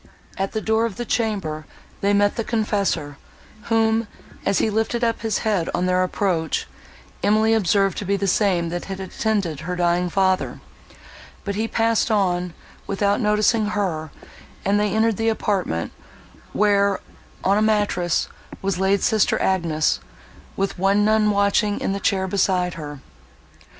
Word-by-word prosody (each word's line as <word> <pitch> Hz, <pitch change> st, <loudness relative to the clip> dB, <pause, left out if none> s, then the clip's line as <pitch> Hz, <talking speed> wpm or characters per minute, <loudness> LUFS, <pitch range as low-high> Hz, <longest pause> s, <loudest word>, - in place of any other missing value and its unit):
At 195 Hz, 0 st, -3 dB
the 220 Hz, -, -1 dB
door 220 Hz, +1 st, +1 dB
of 210 Hz, -, -8 dB
the 240 Hz, -, -4 dB
chamber 195 Hz, -10 st, -2 dB, 0.3 s
they 200 Hz, -, +2 dB
met 205 Hz, 0 st, +3 dB
the 230 Hz, -, -2 dB
confessor, 200 Hz, -10 st, -1 dB, 0.5 s
whom, 225 Hz, 0 st, +2 dB, 0.4 s
as 195 Hz, -, +2 dB
he -, -, +2 dB
lifted 225 Hz, +3 st, -1 dB
up 230 Hz, -1 st, 0 dB
his 225 Hz, -1 st, 0 dB
head 200 Hz, -6 st, +1 dB
on 180 Hz, -, 0 dB
their 185 Hz, 0 st, +2 dB
approach, 180 Hz, -3 st, 0 dB, 0.6 s
Emily 215 Hz, +2 st, +3 dB
observed 195 Hz, -2 st, +2 dB
to 205 Hz, -, -5 dB
be 200 Hz, +1 st, +1 dB
the 200 Hz, -, -1 dB
same 185 Hz, -3 st, +2 dB
that 175 Hz, +1 st, -4 dB
had 195 Hz, -1 st, -6 dB
attended 190 Hz, -4 st, -2 dB
her 180 Hz, +3 st, -4 dB
dying 175 Hz, 0 st, +1 dB
father; 190 Hz, 0 st, +1 dB, 0.8 s
but 200 Hz, -, -3 dB
he 220 Hz, +3 st, -1 dB
passed 225 Hz, 0 st, +1 dB
on, 180 Hz, -5 st, 0 dB, 0.3 s
without 200 Hz, +2 st, +1 dB
noticing 210 Hz, +1 st, +2 dB
her, 180 Hz, -7 st, -2 dB, 0.6 s
and 200 Hz, +1 st, +3 dB
they 210 Hz, -1 st, +1 dB
entered 220 Hz, -1 st, +2 dB
the 225 Hz, 0 st, +1 dB
apartment, 195 Hz, -, -1 dB, 0.6 s
where, 200 Hz, -1 st, +2 dB, 0.4 s
on 200 Hz, +2 st, +3 dB
a -, -, +1 dB
mattress, 205 Hz, -5 st, +1 dB, 0.3 s
was 195 Hz, -2 st, -2 dB
laid 195 Hz, +1 st, +2 dB
sister 220 Hz, -2 st, +2 dB
Agnes, 165 Hz, -5 st, +1 dB, 0.6 s
with 195 Hz, -1 st, -2 dB
one 200 Hz, +2 st, +3 dB
nun 215 Hz, 0 st, +3 dB
watching 205 Hz, +1 st, +2 dB
in 195 Hz, -, -1 dB
the 200 Hz, -, -3 dB
chair 190 Hz, -1 st, 0 dB
beside 185 Hz, -2 st, +1 dB
her. 145 Hz, -3 st, -8 dB
200 Hz, 155 wpm, -22 LUFS, 180-215 Hz, 0.8 s, met